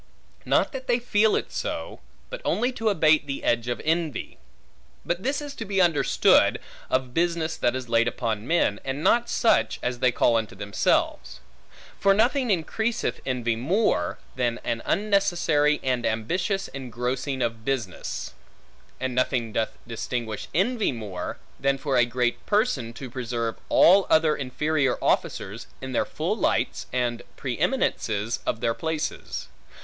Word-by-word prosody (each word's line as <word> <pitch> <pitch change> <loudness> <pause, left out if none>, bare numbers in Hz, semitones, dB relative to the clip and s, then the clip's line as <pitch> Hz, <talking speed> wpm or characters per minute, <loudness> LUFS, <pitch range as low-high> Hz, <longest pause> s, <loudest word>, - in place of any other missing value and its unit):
Not - - +2
that 265 -1 -7
they 240 -1 +3
feel 220 -3 +2
it - - -2
so, - - -4 0.3
but - - -6
only 245 +3 +1
to 225 -3 0
abate 155 -5 +3
the 140 0 -4
edge 120 0 +1
of 120 - -2
envy. 160 -4 -1 0.7
But 175 +1 -1
this 275 +6 -1
is 290 -1 -6
to - - -4
be 195 -2 -1
understood, 170 -5 +4 0.3
of 130 -1 0
business 170 -1 0
that 120 - +1
is 130 -1 -4
laid 115 0 +3
upon 115 -2 -2
men, 160 -11 +2
and 135 +3 -3
not 235 0 +3
such, 230 - +2
as 125 0 -2
they 125 0 +3
call 120 -1 +3
unto 110 -3 -3
themselves. 95 -10 0 0.6
For 195 0 +4
nothing 245 +4 +2
increaseth 220 +6 -1
envy 120 -3 0
more, 135 - +1 0.2
than 120 -2 0
an 115 -1 -2
unnecessary 175 -8 +2
and 125 -2 0
ambitious 180 - -1
engrossing 130 +1 -3
of 115 -1 -3
business. 120 -8 -3 0.7
And 130 0 -2
nothing 120 -3 0
doth 110 +1 -1
extinguish 115 -1 -4
envy 220 - +1
more, 105 -7 -5 0.2
than 140 0 +2
for 135 0 -1
a 120 -1 +5
great 120 0 -1
person 205 - +1
to 130 0 -8
preserve 115 -2 -2
all 190 +3 +6
other 155 -1 +4
inferior 140 0 0
officers, 105 +4 -1
in 130 0 -6
their - - +1
full - - -2
lights - - 0
and 120 -2 -1 0.2
pre 130 -3 -4
eminences 115 - 0
of 110 - -1
their 115 - +1
places. 160 +3 -4
135 Hz, 150 wpm, -25 LUFS, 120-180 Hz, 0.7 s, all